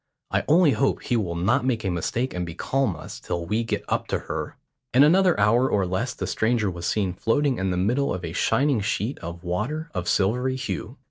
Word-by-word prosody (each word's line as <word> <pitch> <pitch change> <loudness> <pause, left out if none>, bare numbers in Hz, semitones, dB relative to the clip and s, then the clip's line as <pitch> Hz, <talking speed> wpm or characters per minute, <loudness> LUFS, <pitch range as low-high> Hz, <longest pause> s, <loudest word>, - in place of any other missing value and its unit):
I - - +1
only 165 0 +5
hope 135 0 0
he 125 - 0
will 95 -7 -1
not 110 +10 +2
make 125 -4 0
a 95 - 0
mistake 115 +9 -2
and 90 - -2
becalm 95 +6 -1
us - - -9
till 85 -1 -4
we 110 +6 0
get 115 - -3
up - - -1
to - - 0
her." - - -5 0.4
In 135 - +8
another 180 - +4
hour 115 +6 +4
or 100 -2 +1
less 95 +8 -2
the - - -3
stranger 110 -3 +1
was 85 -1 -5
seen 100 -4 0
floating 125 +7 +1
in 95 0 0
the 90 - -1
middle 120 +10 +1
of 90 -1 -3
a 80 - -5
shining 135 +1 +2
sheet 105 +5 -2
of 85 +1 -8
water 135 - -3
of 90 -2 -2
silvery 125 +7 +1
hue. 120 0 -5
110 Hz, 215 wpm, -24 LUFS, 90-130 Hz, 0.4 s, In